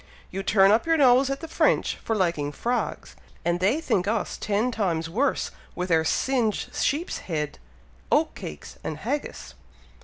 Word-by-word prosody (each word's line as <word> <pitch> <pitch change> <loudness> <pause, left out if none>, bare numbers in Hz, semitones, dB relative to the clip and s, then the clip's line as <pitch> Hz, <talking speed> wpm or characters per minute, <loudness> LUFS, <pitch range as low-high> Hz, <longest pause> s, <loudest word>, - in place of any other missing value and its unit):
You 195 - -3
turn 195 0 +5
up 225 +7 +3
your 325 0 +4
nose 265 -1 +5
at 275 0 -3
the 325 - -6
French - - +2
for 225 - -2
liking 170 -7 0
frogs; 240 +11 -3 0.3
and 175 +1 +1
they 205 - +2
think 195 - 0
us 220 0 -1
ten 215 +4 0
times 165 -8 -1
worse 265 +10 0 0.2
with 180 0 -3
our 160 -1 +4
singed 230 - 0
sheep's 310 +5 0
head, 150 - -2 0.5
oat - - +3
cakes, 75 - -9
and 155 - -4
haggis." 195 - -4
205 Hz, 160 wpm, -25 LUFS, 170-250 Hz, 0.5 s, turn